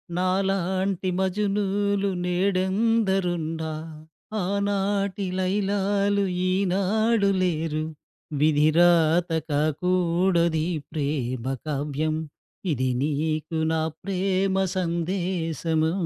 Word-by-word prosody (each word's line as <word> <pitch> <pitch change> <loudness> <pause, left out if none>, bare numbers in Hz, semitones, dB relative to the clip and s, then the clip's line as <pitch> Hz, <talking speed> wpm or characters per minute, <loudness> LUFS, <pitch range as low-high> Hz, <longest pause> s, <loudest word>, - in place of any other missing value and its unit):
నాలాంటి 190 0 0
మజునూలు 200 +1 0 0.2
నేడందరున్న, 190 -2 +1 0.8
ఆనాటిలైలాాలు 200 0 0 0.3
ఈనాడు 200 +3 +2
లేరు. 160 -3 0 0.6
విధిరాత 160 +3 +4 0.2
కాకుడది 170 +2 +1 0.3
ప్రేమ 140 -5 -2 0.2
కావ్యం. 150 +1 -1 0.6
ఇది 130 0 0
నీకు 155 +2 -1
నా 160 - +1 0.2
ప్రేమ 190 0 0 0.2
సందేశము. 170 -2 -1
185 Hz, 55 wpm, -25 LUFS, 160-195 Hz, 0.8 s, విధిరాత